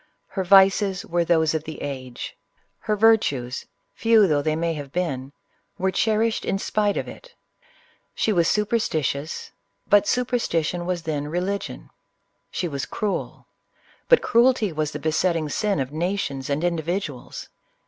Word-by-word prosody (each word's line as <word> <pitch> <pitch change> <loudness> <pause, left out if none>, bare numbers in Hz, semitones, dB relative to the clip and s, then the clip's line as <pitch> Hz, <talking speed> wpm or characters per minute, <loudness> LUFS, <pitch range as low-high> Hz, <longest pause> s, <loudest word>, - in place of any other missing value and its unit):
li - - -17
r 190 - +1
vices 195 +1 +4
were 175 -1 +1
those 160 -2 +2
of 160 -1 -1
the 160 0 -8
age: 130 -3 -6 0.2
— - - -44
her 215 - +2
virtues, 195 - +2 0.3
few 225 -2 +4
though 150 -5 +2
they 155 +1 0
may 165 +1 0
have 145 -3 -7
been, 140 -7 -2 0.5
were 190 +1 0
cherished 220 +3 +1
in 195 - 0
spite 205 0 0
of - - -3
it. - - -12 0.8
She 220 - +1
was 170 -3 +3
superstitious, 160 - -1 0.2
— - - -49
but 205 0 +6
Superstition 175 -9 0
was 180 -2 -2
then 150 -2 -3
K. 175 - -2
ligion. 200 +2 -4 0.6
She 180 - -2
was 140 -5 -4
cruel, 210 -2 -3 0.3
— - - -33
but - - +6
cruelty 235 -3 +3
was 155 -1 -1
the 155 +4 0
ting 155 -2 -2
sin 205 +3 0
of 135 0 -2
nations 155 -5 -2
and 145 +3 -1
individuals. 170 -4 -3
175 Hz, 160 wpm, -24 LUFS, 150-205 Hz, 0.8 s, but